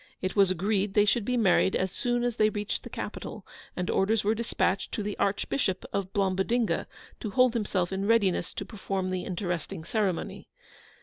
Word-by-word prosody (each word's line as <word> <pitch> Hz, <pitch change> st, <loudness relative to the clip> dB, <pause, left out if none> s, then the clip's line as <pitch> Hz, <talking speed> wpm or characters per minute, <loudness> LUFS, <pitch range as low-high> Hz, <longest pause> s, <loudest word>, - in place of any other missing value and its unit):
It 185 Hz, -, -3 dB
was 200 Hz, -2 st, +5 dB
agreed 195 Hz, +2 st, 0 dB
they 205 Hz, -1 st, +6 dB
should 210 Hz, +1 st, +2 dB
be 250 Hz, +1 st, 0 dB
married 190 Hz, -3 st, +4 dB
as 185 Hz, 0 st, 0 dB
soon 240 Hz, +2 st, 0 dB
as 240 Hz, -1 st, -1 dB
they 215 Hz, 0 st, +4 dB
reached 210 Hz, -1 st, -3 dB
the -, -, -9 dB
capital, -, -, -6 dB, 0.3 s
and 180 Hz, -1 st, -2 dB
orders 215 Hz, +3 st, +2 dB
were 210 Hz, +2 st, +3 dB
dispatched 225 Hz, -4 st, 0 dB
to 210 Hz, -, -2 dB
the 205 Hz, 0 st, -3 dB
Archbishop 200 Hz, 0 st, 0 dB
of 195 Hz, -1 st, -2 dB
Blombodinga, 200 Hz, +4 st, +1 dB, 0.3 s
to 215 Hz, -, -4 dB
hold 250 Hz, +3 st, +4 dB
himself 195 Hz, -6 st, 0 dB
in 195 Hz, +1 st, -1 dB
readiness 200 Hz, -6 st, +2 dB
to -, -, -4 dB
perform 195 Hz, -3 st, -3 dB
the 185 Hz, -1 st, -2 dB
interesting 175 Hz, -4 st, -3 dB
ceremony. 190 Hz, 0 st, -2 dB
200 Hz, 180 wpm, -28 LUFS, 185-220 Hz, 0.3 s, they